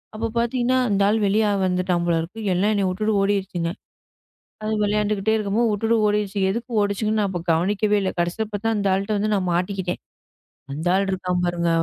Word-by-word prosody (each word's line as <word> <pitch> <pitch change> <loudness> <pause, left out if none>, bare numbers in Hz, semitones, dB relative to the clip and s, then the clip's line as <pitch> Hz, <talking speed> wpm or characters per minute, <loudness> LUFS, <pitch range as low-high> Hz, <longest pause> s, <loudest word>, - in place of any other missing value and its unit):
அப்பப் 225 +1 -4
பாத்தீங்கன்னா 240 +2 +1
அந்த 200 -1 +1
ஆள் 215 +2 +2
வெளிய 210 +2 +2 0.2
வந்துட்டான் 180 -1 0
போலருக்கு. 170 +5 -1
எல்லாம் 195 +4 +2
என்னை 200 -1 +1
விட்டுட்டு 215 +3 0
ஓடிருச்சுங்க. 195 -4 -1 0.9
அது 215 0 -2
விளையாண்டுக்கிட்டே 210 0 +1
இருக்கும் 210 0 -1
போது 235 -2 +3
விட்டுட்டு 225 +3 +1
ஓடிருச்சுங்க. 205 -2 0
எதுக்கு 235 +3 -5
ஓடிச்சுங்கன்னு 210 +1 0
நான் 185 -4 -3
கவனிக்கவே 205 +5 +1
இல்லை. 190 - -1
கடைசியாபாத்தா 210 +5 -2
அந்த 200 -1 0
ஆள்ட 195 +2 -2
வந்து 215 +1 0
நான் 185 -2 -1
மாட்டிக்கிட்டேன். 180 +1 -2 0.7
அந்த 155 +5 -3
ஆள் 195 +1 +1
இருக்கான் 180 -1 -1
பாருங்க. 170 -1 0
200 Hz, 160 wpm, -23 LUFS, 185-215 Hz, 0.9 s, போது